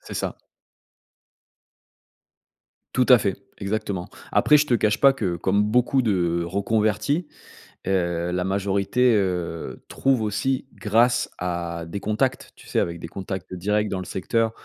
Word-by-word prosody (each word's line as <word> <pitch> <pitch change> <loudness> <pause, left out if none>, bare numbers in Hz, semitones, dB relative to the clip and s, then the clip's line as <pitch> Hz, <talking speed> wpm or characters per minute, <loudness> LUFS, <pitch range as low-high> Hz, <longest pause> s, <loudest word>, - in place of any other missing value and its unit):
C'est - - -9
ça. - - -3 2.6
Tout 125 - +3
à 125 - +9
fait. 100 -3 -1 0.2
Exactement. 100 -3 -3 0.2
Après, 150 - +5
je 150 - +2
te 125 - +2
cache 105 -2 +1
pas 140 -1 +7
que, 100 -10 -2
comme 95 +4 +1
beaucoup 125 +4 +2
de 85 -6 +1
reconvertis, 110 - 0 0.6
heu, 85 -2 0
la 90 0 -1
majorité, 100 +6 +1
heu, 90 -4 -2
trouve 135 -3 +1
aussi 120 +5 -1
grâce 120 +3 +2
à 85 -2 -3
des 90 +4 -5
contacts, 110 +6 -1
tu - - -17
sais, - - 0
avec 85 0 -2
des 80 - -7
contacts 95 +1 -6
directs 105 +4 0
dans 95 - -2
le 95 - -6
secteur 110 +6 0
100 Hz, 145 wpm, -24 LUFS, 90-115 Hz, 2.6 s, à